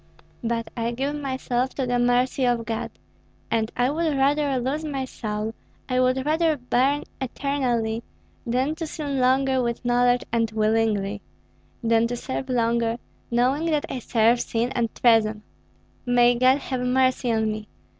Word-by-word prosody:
But 230 -1 -1
I 230 -1 -1
give 275 +4 -2
myself 260 -2 -2
to 265 - -1
the 245 0 0
mercy 245 +2 +2
of 240 -2 +1
God, 225 -1 -3 0.6
and 225 0 0
I 245 +2 +2
would 315 -2 0
rather 280 0 +2
lose 270 +5 -2
my 275 -4 -3
soul, 215 -3 -4 0.3
I 255 -1 0
would 255 +1 +2
rather 315 0 +2
burn 260 +3 +1 0.2
eternally, 245 -4 -1 0.4
than 255 +5 0
to 330 -2 -4
sin 285 -3 -3
longer 260 +1 +3
with 235 0 -3
knowledge 245 0 +3
and 230 -1 +1
willingly, 215 -2 0 0.6
than 230 0 +3
to 245 - -3
serve 260 +2 -5
longer, 235 -1 +1 0.3
knowing 255 +6 +1
that 305 -3 +1
I 260 - -3
serve 230 +1 +2
sin 235 +2 -1
and 235 -2 0
treason. 220 -3 +3 0.6
May 245 0 +4
God 255 +2 +4
have 260 -3 -4
mercy 255 -1 +2
on 220 -1 +1
me! 215 0 -6
245 Hz, 155 wpm, -24 LUFS, 230-265 Hz, 0.6 s, May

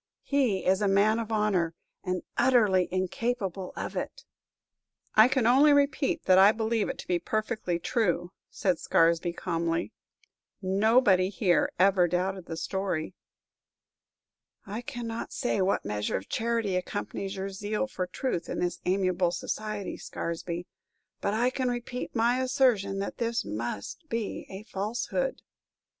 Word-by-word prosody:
He 260 -9 +1
is 190 +2 +3
a 205 - +2
man 205 +3 +3
of 225 -1 -4
honor, 195 -6 +1 0.3
and 185 -1 -2
utterly 210 -8 +4
incapable 190 0 -2
of - - -5
it." - - -4 0.9
"I 215 +2 +8
can 260 -2 +1
only 275 +5 +6
repeat 280 -1 +2
that 185 0 +5
I 195 +2 +8
believe 220 -1 0
it - - -4
to - - -9
be 175 -1 +1
perfectly 215 -2 -1
true!" 175 -3 0 0.2
said 185 -5 0
Scaresby, 165 +1 +3
calmly. 165 -1 -2 0.7
"Nobody 195 -1 +3
here 180 -2 +2
ever 185 -1 +4
doubted 185 +1 -2
the 165 - -5
story." 185 -3 -2 1.5
"I 210 +4 -5
cannot 240 -4 -5
say 245 -6 0
what 190 +1 +1
measure 105 0 -1
of 95 - -8
charity 230 -4 0
accompanies 195 +1 -3
your 195 +1 -4
zeal 210 +5 -2
for 185 -9 -4
truth 180 -2 -3
in - - -3
this 175 -1 -2
amiable 185 -1 +2
society, 210 +1 -4
Scaresby, 170 +1 -4 0.6
but 200 - 0
I 245 +3 +2
can 255 -1 -1
repeat 245 +1 -4
my 240 +3 +2
assertion 250 -7 +2
that 195 - -4
this 235 0 -1
must 110 - -5
be 230 -2 -3
a 195 +2 -8
falsehood." 235 - -2
200 Hz, 140 wpm, -28 LUFS, 180-230 Hz, 1.5 s, I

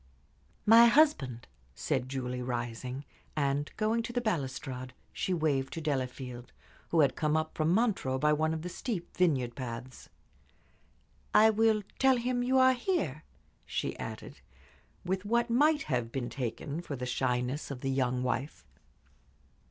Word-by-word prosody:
"My 230 +2 +9
husband," 230 - +3 0.3
said 130 - -1
Julie, 125 -2 -3
rising, 125 +2 -4 0.3
and, 145 0 0
going 220 +2 +1
to 230 - -5
the 245 - 0
balustrade, 130 - -3 0.2
she 190 - -2
waved 150 -6 0
to - - -4
Delafield, 130 -4 -4 0.4
who 165 - +4
had 135 -3 +3
come 155 0 +1
up 155 0 -2
from 155 +1 +1
Montreux 190 - +1
by 150 +2 +3
one 155 +1 +1
of 160 0 -3
the - - -4
steep 180 0 -5
vineyard 135 -10 +1
paths. 125 0 -7 1.3
"I 220 +1 +7
will 220 -1 +3 0.2
tell 265 -1 +5
him 245 +1 -1
you 255 +2 +2
are 260 0 +6
here," 235 - -1 0.4
she - - -3
added, - - -7 0.6
with 190 +1 -1
what 235 +3 +1
might 295 +4 +4
have 125 -4 -2
been 125 -2 -3
taken 140 +4 -4
for 150 -5 -5
the 125 -1 -4
shyness 125 +3 -1
of 135 -3 -6
the 135 - -1
young 125 -1 0
wife. 130 +3 -3
150 Hz, 150 wpm, -30 LUFS, -, 1.3 s, My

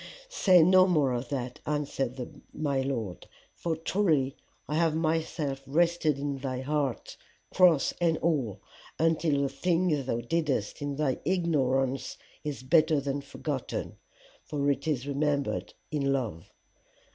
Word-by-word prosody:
Say 185 - +5
no 185 +2 +6
more 150 -7 +3
of 120 0 -3
that, 125 -3 -4
answered 135 -4 -3
my 140 -3 0
Lord, 115 -10 -4 0.3
for 165 -2 -2
truly 160 -5 +1 0.3
I 150 - -3
have 160 0 +2
myself 155 -3 -1
rested 165 0 +2
in 140 -1 -3
thy 130 -1 -3
heart, 140 -2 -2 0.4
cross 175 -6 +5
and 165 -2 +3
all, 130 - -1 0.4
until 160 -3 +2
the 140 - 0
thing 165 0 +1
thou 115 - 0
didest 145 -3 -1
in 145 -1 -2
thy 140 -3 0
ignorance 135 -7 0 0.3
is 145 -4 -4
better 155 +2 +4
than 140 0 -2
forgotten, 140 - -4 0.5
for 145 -1 0
it 140 - -3
is 140 -5 0
remembered 145 0 -1 0.2
in 140 -3 0
love. 115 -12 -3
145 Hz, 135 wpm, -29 LUFS, 135-160 Hz, 0.5 s, no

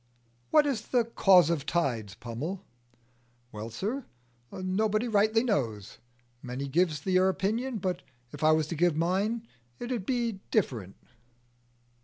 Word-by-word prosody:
"What 305 -1 +5
is 255 -6 -2
the 245 -2 +2
cause 185 -7 +5
of 165 - +1
the 140 - -11
tides, 120 - -1
Pummel?" 150 - -5 0.9
"Well, 110 +2 -6
sir, 215 - -4 0.4
nobody 215 +5 0
rightly 220 +1 +3
knows. 115 - -2 0.4
Many 125 +3 -5
gives 155 0 +1
their 185 +2 +3
opinion, 225 +6 -1
but 185 -2 -2 0.3
if 145 0 -7
I 155 - +6
was 155 0 +3
to 170 - -3
give 170 0 +2
mine, 200 +7 0 0.3
it 245 - -5
'ud 225 -7 -3
be 235 -6 -1
different." 115 - -1
185 Hz, 140 wpm, -29 LUFS, 145-220 Hz, 0.9 s, I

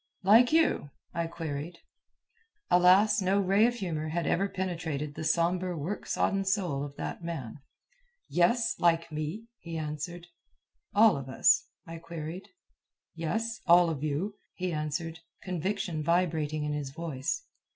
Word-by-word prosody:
"Like 225 +6 +6
you?" 320 - +2 0.2
I 170 0 -1
queried. 165 0 -5 0.9
Alas, 185 +4 +5
no 190 +2 +2
ray 200 +3 +4
of 240 - -1
humor 160 -8 -3
had 170 +1 -1
ever 195 +6 +1
penetrated 165 -6 -3
the 155 - -6
sombre 175 +2 +1
work 170 +8 -4
sodden 195 0 +1
soul 185 -8 0
of 145 -1 -7
that - - -5
man. 150 -7 -5 0.7
"Yes, 225 +7 +2
like 165 -1 +2
me," 155 +9 -4
he 165 -1 -6
answered. 155 +3 -5 0.7
"All 215 -5 +6
of 135 -1 -7
us?" 130 - +4 0.2
I 165 0 -8
queried. 165 +2 -7 0.7
"Yes, 215 +7 -2
all 175 -1 +6
of 150 -2 -5
you," 155 +8 -1 0.2
he 180 -1 -2
answered, 160 +2 -3 0.2
conviction 185 -2 -2
vibrating 160 -3 +1
in 150 0 -2
his 145 -2 -3
voice. 160 - -3
170 Hz, 140 wpm, -29 LUFS, 155-190 Hz, 0.9 s, Like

